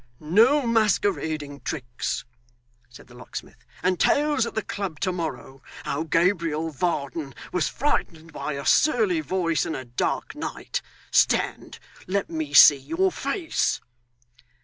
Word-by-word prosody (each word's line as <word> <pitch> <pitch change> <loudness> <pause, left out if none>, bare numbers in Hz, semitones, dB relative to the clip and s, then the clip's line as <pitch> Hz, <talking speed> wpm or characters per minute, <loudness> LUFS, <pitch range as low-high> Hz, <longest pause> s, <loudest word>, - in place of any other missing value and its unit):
'No 230 - +4
masquerading 185 -10 0
tricks,' 120 -3 -4 0.6
said 120 - -14
the 120 - -18
locksmith, 125 +1 -9 0.2
'and 185 -1 +1
tales 290 -4 +2
at - - -8
the 220 - -1
club 190 -7 -5
to 185 - +1
morrow, 160 -6 -5 0.2
how 140 - -2
Gabriel 165 -1 +1
Varden 145 -2 -2 0.2
was 180 - +1
frightened 165 - -2
by 150 - -4
a 140 -1 -5
surly 330 - +3
voice 180 - 0
and 160 - -3
a 130 - -6
dark 120 +1 -2
night. - - -4 0.3
Stand - - +1 0.3
let 195 0 -1
me 155 -3 -3
see 145 0 +9
your 355 - 0
face. 355 -4 -1
165 Hz, 130 wpm, -25 LUFS, 145-215 Hz, 0.6 s, see